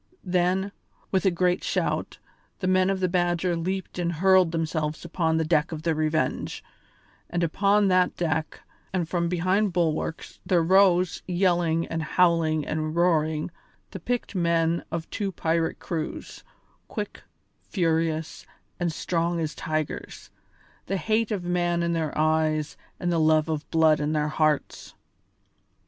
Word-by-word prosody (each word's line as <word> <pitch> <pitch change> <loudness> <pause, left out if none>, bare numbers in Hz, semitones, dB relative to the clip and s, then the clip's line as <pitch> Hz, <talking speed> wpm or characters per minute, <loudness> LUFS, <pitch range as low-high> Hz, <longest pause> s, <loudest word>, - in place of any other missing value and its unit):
Then, 185 +2 +1 0.4
with 190 0 +2
a - - +7
great 180 0 +1
shout, - - -1 0.4
the 185 - -4
men 185 0 +3
of 195 -1 -1
the 185 - +3
Badger 175 0 +1
leaped 185 +2 -3
and 175 -1 0
hurled 185 0 +4
themselves 160 -1 -2
upon 165 -1 0
the 160 - +1
deck 155 0 +1
of 155 -1 -6
the 165 -1 +1
Revenge, 155 -3 -1 0.7
and 175 0 -1
upon 200 +5 +3
that 185 -1 +2
deck 160 -2 -2 0.3
and 180 -3 -1
from 170 0 -1
behind 185 +3 +1
bulwarks 165 -2 -2
there 175 -3 +2
rose, 185 -1 +4
yelling 175 -3 +1
and 165 0 -3
howling 160 -2 +2
and 155 0 -2
roaring, 160 -2 +1 0.4
the 190 - -6
picked 245 +6 -3
men 170 -2 +1
of 165 0 -4
two 200 -2 -2
pirate 165 -2 -1
crews, 160 -3 -5 0.4
quick, - - -5 0.5
furious, 160 -3 -1 0.3
and 175 -1 0
strong 170 +1 -1
as 155 -1 -2
tigers, 155 -1 -4 0.6
the 195 - -1
hate 220 +5 0
of 200 -4 -2
man 175 -1 0
in 170 0 0
their 160 -3 -2
eyes 155 -1 +1 0.2
and 175 - -1
the 170 - +1
love 155 0 +3
of 155 -2 -3
blood 160 -2 +4
in 150 +1 -1
their 150 -1 0
hearts. 155 -2 -1
170 Hz, 145 wpm, -26 LUFS, 160-180 Hz, 0.7 s, a